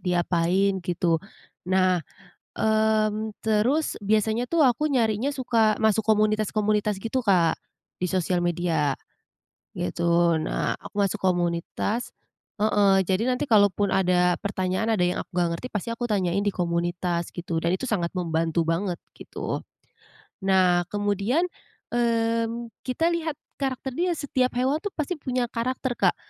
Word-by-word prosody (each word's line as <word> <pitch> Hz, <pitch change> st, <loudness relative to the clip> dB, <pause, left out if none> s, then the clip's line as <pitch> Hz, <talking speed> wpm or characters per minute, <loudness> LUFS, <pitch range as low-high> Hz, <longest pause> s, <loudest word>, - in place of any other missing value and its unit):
diapain 180 Hz, +2 st, +1 dB
gitu. 175 Hz, -1 st, 0 dB, 0.5 s
Nah, 185 Hz, -1 st, +3 dB, 0.6 s
mmm, 215 Hz, 0 st, +1 dB
terus 225 Hz, +8 st, +1 dB
biasanya 220 Hz, +3 st, +1 dB
tuh 330 Hz, -3 st, +3 dB
aku 260 Hz, +4 st, +2 dB
nyarinya 235 Hz, -2 st, +1 dB
suka 225 Hz, -4 st, +2 dB
masuk 220 Hz, 0 st, +4 dB
komunitas-komunitas 215 Hz, -1 st, +2 dB
gitu, 225 Hz, +6 st, -2 dB
Kak, 180 Hz, -8 st, +2 dB, 0.4 s
di 180 Hz, -, 0 dB
sosial 180 Hz, -1 st, 0 dB
media 170 Hz, -5 st, 0 dB, 0.8 s
gitu. 170 Hz, -, +1 dB
Nah 155 Hz, -, -2 dB
aku -, -, -13 dB
masuk 200 Hz, +1 st, 0 dB
komunitas 175 Hz, +5 st, -1 dB, 0.5 s
heeh, 200 Hz, -2 st, +4 dB
jadi 190 Hz, +5 st, +1 dB
nanti 250 Hz, +3 st, -3 dB
kalaupun 205 Hz, -2 st, +4 dB
ada 180 Hz, -1 st, +2 dB
pertanyaan, 200 Hz, +2 st, -1 dB
ada 205 Hz, -, 0 dB
yang 180 Hz, -, 0 dB
aku -, -, -56 dB
nggak 175 Hz, -1 st, +1 dB
ngerti 250 Hz, -, -6 dB
pasti 210 Hz, +2 st, -3 dB
aku 230 Hz, +1 st, -3 dB
tanyain 200 Hz, -3 st, 0 dB
di 205 Hz, -, +1 dB
komunitas 175 Hz, 0 st, -1 dB
gitu, 170 Hz, -1 st, -4 dB
dan 170 Hz, +2 st, 0 dB
itu 190 Hz, -, -3 dB
sangat 175 Hz, -6 st, -1 dB
membantu 165 Hz, -2 st, 0 dB
banget 170 Hz, +2 st, -1 dB, 0.2 s
gitu. -, -, -5 dB, 0.8 s
Nah, 185 Hz, -2 st, +3 dB
kemudian, 205 Hz, -, 0 dB, 0.5 s
mmm, 230 Hz, 0 st, 0 dB, 0.2 s
kita 325 Hz, +7 st, +1 dB
lihat 325 Hz, -3 st, -2 dB, 0.2 s
karakter 265 Hz, -1 st, -2 dB
dia 355 Hz, +3 st, +1 dB
setiap 265 Hz, -4 st, 0 dB
hewan 260 Hz, +5 st, +1 dB
tuh 410 Hz, -, -3 dB
pasti 310 Hz, +3 st, -2 dB
punya 255 Hz, -3 st, -1 dB
karakter, 255 Hz, +2 st, -2 dB
Kak. -, -, +2 dB
205 Hz, 135 wpm, -25 LUFS, 180-230 Hz, 0.8 s, masuk